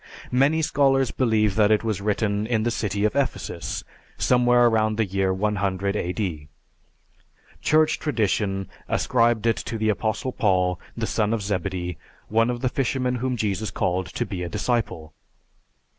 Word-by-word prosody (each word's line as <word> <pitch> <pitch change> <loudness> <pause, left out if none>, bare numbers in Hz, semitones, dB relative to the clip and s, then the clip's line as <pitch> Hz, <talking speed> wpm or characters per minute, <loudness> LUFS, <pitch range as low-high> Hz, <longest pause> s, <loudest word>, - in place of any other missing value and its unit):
Many 140 +6 +3
scholars 135 -3 +2
believe 110 -5 +2
that 105 -1 +5
it 110 0 +3
was 110 -3 -2
written 105 0 0
in 110 -2 +1
the 120 - +1
city 105 -2 -1
of 105 - 0
Ephesus, 140 -2 -2 0.3
somewhere 120 -1 +4
around 110 -2 +2
the 110 - +2
year 95 0 0
100 100 0 -1
A.D. 90 -6 -3 1.1
"Church 155 0 +3
tradition 100 - 0 0.2
ascribed 115 -2 +2
it 115 -1 +2
to 115 - -4
the 110 0 0
Apostle 110 +4 -1
John, 90 -3 +2 0.2
the 115 - -1
son 110 0 0
of 110 - -4
Zebedee, 90 -4 -3 0.3
one 115 +2 +3
of 120 -1 -3
the 130 - +1
fishermen 125 -1 -1
whom 125 +1 -2
Jesus 105 -1 -1
called 95 -2 -1
to - - -3
be 90 -3 -5
a 90 - -3
disciple. 85 -8 -2
110 Hz, 155 wpm, -24 LUFS, 95-120 Hz, 1.1 s, that